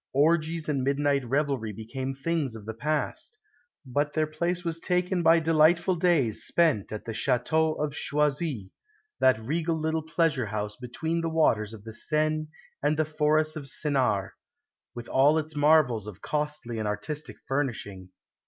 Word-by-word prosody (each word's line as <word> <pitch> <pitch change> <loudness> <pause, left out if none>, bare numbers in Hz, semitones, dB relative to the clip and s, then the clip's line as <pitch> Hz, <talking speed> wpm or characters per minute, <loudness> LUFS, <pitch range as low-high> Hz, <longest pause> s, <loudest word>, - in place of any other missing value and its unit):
Orgies 160 +2 +2
and 140 -4 0
midnight 140 0 +1
revelry 135 -4 0
became 120 +6 -5
things 140 -2 -2
of 110 -2 -10
the 110 - -5
past, 155 - -2 0.5
but 145 +3 -1
their 155 -1 +2
place 170 +3 -2
was 165 -1 -1
taken 180 +1 0
by 165 0 +6
delightful 165 +3 +3
days 160 - +2
spent 155 - +2
at 110 - -6
the 115 - -4
Château 155 +7 +1
of 150 -1 -1
Choisy, 145 - -1 0.5
that 130 -3 +5
regal 160 +7 -1
little 160 +1 0
pleasure 155 -6 0
house 105 0 -3
between 160 +8 -3
the 165 - -1
waters 115 -10 +2
of 110 -3 -9
the 110 0 -8
Seine 155 +5 0 0.3
and 150 +2 +1
the 155 - +2
Forest 155 +1 +1
of 150 -3 -6
Sénart, 130 - 0 0.6
with 120 0 -7
all 145 +4 +4
its 155 0 -3
marvels 145 -8 +3
of 100 -3 -9
costly 150 -6 -2
and 110 - -2
artistic 125 +9 -4
furnishing. 115 -9 -3
150 Hz, 155 wpm, -27 LUFS, 120-160 Hz, 0.6 s, by